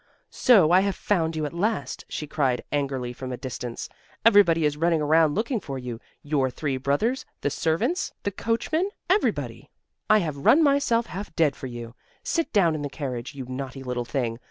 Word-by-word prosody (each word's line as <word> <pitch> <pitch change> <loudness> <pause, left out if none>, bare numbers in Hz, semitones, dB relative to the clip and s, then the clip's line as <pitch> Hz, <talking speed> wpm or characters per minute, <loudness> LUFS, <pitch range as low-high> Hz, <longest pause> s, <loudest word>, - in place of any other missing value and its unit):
"So 195 -11 +5
I 180 - +7
have 195 0 0
found 165 -5 0
you 155 -1 -1
at 145 - -5
last," 210 +6 -2
she 150 - -4
cried 140 -5 0
angrily 135 -4 -2
from 130 +1 -7
a 125 - -4
distance. 120 -2 -5 0.4
"Everybody 185 -8 +6
is 150 -1 +1
running 165 +1 +2
around 155 0 +3
looking 230 +3 0
for 135 -8 -6
you 125 -3 -6 0.2
your 145 -3 +1
three 135 +2 -3
brothers, 145 - 0 0.2
the 145 - 0
servants, 165 - 0
the 200 - -1
coachman 235 - -1 0.2
everybody! 400 +2 0 0.4
I 215 - +7
have 155 -8 -1
run 280 - +5
myself 275 -5 +3
half 190 -5 -7
dead 150 -4 +3
for 130 - -7
you. 120 -1 -8 0.3
Sit 330 - -1
down 180 -7 +4
in 155 - -3
the 145 - -3
carriage, 130 -2 -5
you 135 -2 -6
naughty 130 +1 -6
little 125 -1 -3
thing. 120 -2 -2
155 Hz, 185 wpm, -25 LUFS, 130-200 Hz, 0.4 s, I